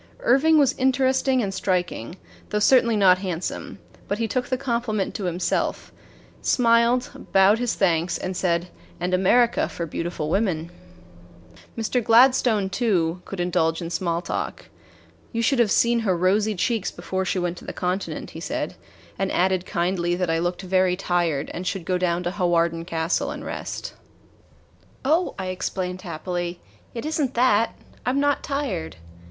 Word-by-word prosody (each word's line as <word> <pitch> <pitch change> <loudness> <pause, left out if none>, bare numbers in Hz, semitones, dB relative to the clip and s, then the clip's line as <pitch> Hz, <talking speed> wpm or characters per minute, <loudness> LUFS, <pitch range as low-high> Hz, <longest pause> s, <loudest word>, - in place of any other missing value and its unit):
Irving 320 - +4
was 280 -2 +4
interesting 260 -1 +2
and 195 -1 -2
striking, 180 - -2 0.3
though 210 - -1
certainly 235 +1 +4
not 185 -2 +5
handsome; 185 -3 -4 0.3
but 205 - -1
he 230 0 -1
took 250 +3 -1
the 255 - -1
compliment 235 -6 -1
to 200 - -4
himself, 175 0 -1 0.5
smiled, 235 +1 +2
bowed 195 +3 +5
his 245 -1 -1
thanks, 175 -2 +1
and 185 0 -4
said: 175 -1 0 0.3
"And 180 +1 -2
America 235 +6 +3
for 170 - -4
beautiful 165 -1 -4
women." 175 -5 0 1.1
Mr. 230 +2 0
Gladstone, 230 -3 +4
too, 185 -6 0
could 195 - -7
indulge 165 -2 +1
in 170 -1 -5
small 170 -1 -1
talk. - - -4 0.6
"You 230 -1 -1
should 270 +2 +2
have 235 -3 +4
seen 235 +3 +3
her 195 -6 +1
rosy 205 +4 +2
cheeks 215 +2 0
before 190 0 -3
she 190 - -1
went 175 -1 -1
to - - -14
the - - -5
Continent," 180 +2 -3
he - - -8
said, - - -3 0.5
and 195 0 0
added 185 0 +1
kindly 175 0 0
that 180 -2 -1
I 165 - +1
looked 175 +2 -2
very 185 -1 +2
tired 175 -6 0
and 180 +2 -5
should 185 -2 -3
go 180 0 0
down 175 -1 0
to 175 - -1
Hawarden 170 -3 +1
Castle 165 0 -1
and - - -6
rest. - - -5 1.1
"Oh," 325 +6 +2
I 190 -1 -3
explained 185 0 -3
happily, 175 0 -4 0.4
"it 230 - -4
is 315 0 -1
n't 265 -2 -1
that 230 -2 +3 0.3
I - - 0
'm 270 +2 +1
not 285 -1 +2
tired. 260 - -3
190 Hz, 160 wpm, -24 LUFS, 175-235 Hz, 1.1 s, not